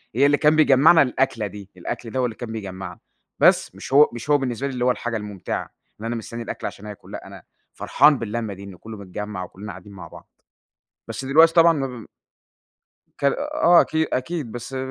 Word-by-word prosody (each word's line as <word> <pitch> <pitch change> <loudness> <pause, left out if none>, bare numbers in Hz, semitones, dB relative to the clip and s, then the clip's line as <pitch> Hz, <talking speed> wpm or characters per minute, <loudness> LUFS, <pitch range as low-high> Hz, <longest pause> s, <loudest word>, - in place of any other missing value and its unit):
هي 135 +4 +4
اللي 145 0 +4
كان 150 +1 +3
بيجمعنا 155 +2 +6
الأكلة 130 -4 0
دي، 100 0 -11
الأكل 115 +6 -6
ده 130 - -2
هو 125 - +2
اللي 115 -2 -4
كان 120 -2 -7
بيجمعنا، 95 -4 -7 0.4
بس - - +4
مش - - -8
هو 145 +2 +7
مش 120 +4 -8
هو 145 - +5
بالنسبة 135 -1 -3
لي 135 - -5
اللي 125 -1 -1
هو 125 - +4
الحاجة 120 -1 -3
الممتعة، 105 -3 -5 0.3
إن - - -6
أنا 115 +1 -2
مستني 115 +1 -6
الأكل - - -5
عشان 100 - -10
آكُل 105 -1 -11
لأ، - - -8
أنا - - -12 0.3
فرحان 145 +1 +3
باللمّة 115 -1 -4
دي 100 +1 -11
إنه 100 -2 -10
كله 110 +2 -10
متجمع 100 0 -6
وكلنا 100 +4 -9
قاعدين 95 +2 -12
مع 90 -3 -10
بعض. - - -14 0.8
بس - - -5
دلوقتي 160 +5 +5
طبعًا 170 0 +6
مبم 130 -7 -5 1.1
كا 140 - +3 0.3
آه 175 - +6
أكيد، 160 0 0
أكيد، 135 -2 -3
بس 120 +2 -6
120 Hz, 200 wpm, -22 LUFS, 105-140 Hz, 1.1 s, هو